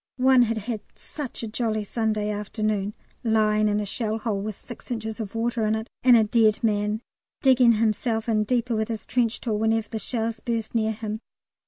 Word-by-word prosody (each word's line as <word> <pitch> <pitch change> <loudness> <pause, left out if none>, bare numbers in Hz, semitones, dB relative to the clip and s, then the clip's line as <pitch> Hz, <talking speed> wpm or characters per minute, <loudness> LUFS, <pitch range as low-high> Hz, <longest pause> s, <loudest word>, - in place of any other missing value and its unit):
One 260 0 +5
had 230 -1 +2
had 220 0 -3
"such 285 -6 -7
a - - -2
jolly 215 -1 -1
Sunday 215 -1 -1
afternoon" 210 0 -2 0.3
lying 215 -2 +3
in 210 0 +1
a 210 - -2
shell 220 +2 -2
hole 215 -3 -2
with 210 0 -4
six 240 - -12
inches 220 -2 -4
of 215 -1 -5
water 230 0 0
in 215 - +2
it 220 +1 -5
and 245 -2 +7
a 225 - +5
dead 215 0 +3
man, 210 0 +1 0.4
digging 255 -3 +6
himself 220 +1 0
in 215 -2 +2
deeper 240 +1 0
with 220 0 0
his 220 -3 -5
trench 240 -2 0
tool 215 -4 -1
whenever 225 0 +1
the 220 - -3
shells 225 -1 -2
burst 230 -1 -3
near 220 -1 +1
him. 215 0 -4
220 Hz, 195 wpm, -25 LUFS, 215-235 Hz, 0.4 s, and